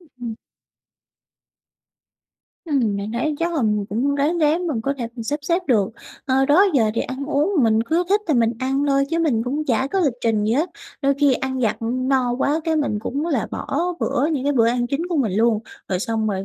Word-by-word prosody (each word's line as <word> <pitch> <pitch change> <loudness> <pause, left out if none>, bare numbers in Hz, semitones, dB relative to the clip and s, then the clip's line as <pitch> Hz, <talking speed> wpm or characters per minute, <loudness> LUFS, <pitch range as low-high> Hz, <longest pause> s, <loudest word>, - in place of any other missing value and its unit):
Ừm. 245 -9 -8 2.3
Ừm, 250 -10 +1
mình 200 +2 -4
thấy 300 +6 -1
chắc 340 +1 -1
là 295 - 0
mình 210 -2 +1
cũng 255 +7 0
ráng 295 +5 +1
ráng 320 +3 +2
mình 280 -9 -1
có 275 +5 -1
thể 235 - -2 0.2
sắp 290 +5 -1
xếp 340 +5 0
được. 210 -6 +3 0.4
Ờ, 265 0 +3
đó 330 +8 +5
giờ 225 -5 +3
thì - - 0
ăn 260 +2 -4
uống 300 +5 +1
mình 220 -1 +3
cứ 330 +8 0
thích 410 +2 +3
thì 305 - +3
mình 230 -1 +3
ăn 270 +3 0
thôi 275 0 +3
chứ 330 - 0
mình 285 -9 +1
cũng 285 +5 -2
chả 260 0 +1
có 390 - +2
lịch 285 -8 +2
trình 220 -3 +1
gì 215 - +1
hết, 310 +8 +1 0.3
đôi 275 0 +3
khi 285 -2 +5
ăn 260 +1 -2
vặt, 220 -3 +1
ừ, 225 - -3
no 255 -1 +1
quá 295 +4 +1
cái 325 -1 +1
mình 280 -9 0
cũng 280 +7 -3
là 275 -10 0
bỏ 340 +6 -2
bữa, 270 - +1
những 300 -5 -1
cái 285 - +2
bữa 235 -4 +3
ăn 240 0 0
chính 280 +7 -2
của 345 - -1
mình 240 -9 +1
luôn. 220 +2 +3 0.3
Rồi 185 -2 0
xong 220 +1 -1
rồi 195 -2 -2
270 Hz, 225 wpm, -21 LUFS, 230-300 Hz, 2.3 s, đó